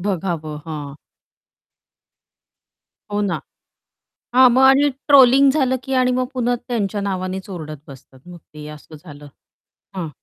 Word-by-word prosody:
बघावं, 170 -5 -4
हां. 150 -3 -7 2.2
हो 205 0 -2
ना. 175 - -3 1.0
हां 255 0 +7
मग 260 - +4
आणि 270 +2 +5 0.2
ट्रोलिंग 275 -1 +6
झालं, 265 -3 0
की 270 - -5
आणि 255 -1 +2
मग 255 - 0
पुन्हा 245 -1 0
त्यांच्या 210 -4 -2
नावानेच 190 0 -4
ओरडत 155 -5 -7
बसतात 135 -1 -15
मग 175 -1 -12
ते 150 -1 -13
असं 155 +1 -15
झालं. 145 -3 -12 0.7
हां. 175 -4 -4
190 Hz, 130 wpm, -19 LUFS, 155-255 Hz, 2.2 s, हां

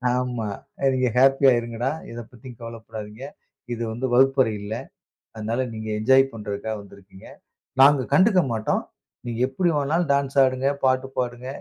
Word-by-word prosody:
ஆமா, 125 -3 -2 0.3
அ - - -4
"நீங்க 130 -1 +1
ஹேப்பியா 135 +1 +5
இருங்கடா. 120 +2 -3 0.2
எத 115 - -7
பத்தியும் 125 -1 -12
கவலைப்படாதீங்க. 110 0 -8 0.5
இது 120 - -4
வந்து 125 +3 -3
வகுப்பறை 130 -3 +4
இல்ல. 105 +2 -5 0.6
அதனால 115 +4 -2
நீங்க 110 0 -6
என்ஜாய் 130 +4 +5
பண்ணுறதுக்காக 105 0 -4
வந்திருக்கீங்க. 100 -1 -15 0.5
நாங்க 140 -1 +6
கண்டுக்க 190 -1 +5
மாட்டோம். 110 -1 -1 0.4
நீங்க 115 -1 -4
எப்டி 175 +6 0
வேணாலும் 155 +3 0
டான்ஸ் 140 0 -1
ஆடுங்க, 130 +1 0 0.2
பாட்டு 130 0 +2
பாடுங்க, 125 0 -3
125 Hz, 140 wpm, -24 LUFS, 110-135 Hz, 0.6 s, நாங்க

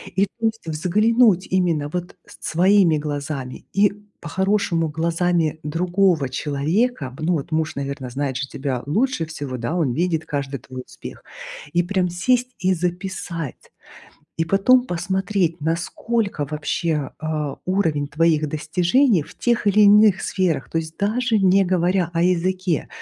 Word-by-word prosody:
И, 195 - +3
то 225 +3 -6
есть, 225 -6 -2
взглянуть 200 +5 +3
именно 170 -6 +1
вот 180 0 -5 0.2
своими 175 0 +3
глазами 145 -3 -5
и, 200 0 +4 0.3
по-хорошему, 185 -1 0
глазами 165 0 0
другого 175 -2 +1
человека. 150 - -1
Б 145 +4 -9
ну 175 +2 +2
вот 150 0 -3
муж, 155 0 0
наверно, 140 -2 -4
знает 135 -1 -2
же 135 +1 -3
тебя 130 -3 -4
лучше 210 - 0
всего. 145 -5 -6
Да, 120 +8 -3
он 150 -9 +1
видит 165 0 0
каждый 140 -2 -3
твой 130 -1 -9
успех. - - -11 0.5
И 175 - +3
прям 180 -1 0
сесть 250 +8 +1
и 185 0 +2
записать. 175 -3 -4 0.7
И 165 - +2
потом 245 +8 +4
посмотреть, 180 -1 -1
насколько 175 +3 -1
вообще, 150 -1 -2
а, 155 -3 -3
уровень 160 -7 0
твоих 155 -1 +2
достижений 175 - +2
в - - -15
тех 235 -3 0
или 210 +1 +5
иных 205 -1 +6
сферах 180 -8 -1
То 165 - 0
есть 160 0 -6
даже 225 +3 +1
не 195 0 +4
говоря 180 -1 +1
о 165 - +1
языке. 180 -1 0
170 Hz, 145 wpm, -22 LUFS, 150-195 Hz, 0.7 s, иных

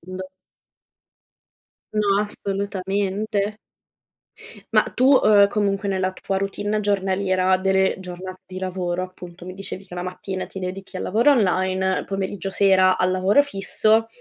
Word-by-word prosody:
quando 185 +2 -7 1.7
No, 205 -2 +2
assolutamente. 200 +1 -2 1.2
Ma, - - +6
uhm, - - -9
tu, 255 - +2 0.2
uhm, 205 -1 +6
comunque 200 -1 -1
nella 185 -1 0
tua 195 +1 -3
routine 205 +2 -2
giornaliera, 190 -2 +1
delle 190 0 +2
giornate 185 0 -8
di 185 0 -7
lavoro, 185 -1 -2
appunto, 180 -1 -11
mi 185 - -7
dicevi 195 0 -8
che 180 - -10
la 180 - -4
mattina 185 +1 -5
ti - - -9
dedichi 190 +1 -6
al - - -4
lavoro 230 +9 +3
online, 190 -5 +2
il - - -8
pomeriggio 195 0 -4
sera 190 -1 +4
al 185 0 +2
lavoro 190 +9 +4
fisso. 220 -1 +1
190 Hz, 140 wpm, -22 LUFS, 185-200 Hz, 1.7 s, Ma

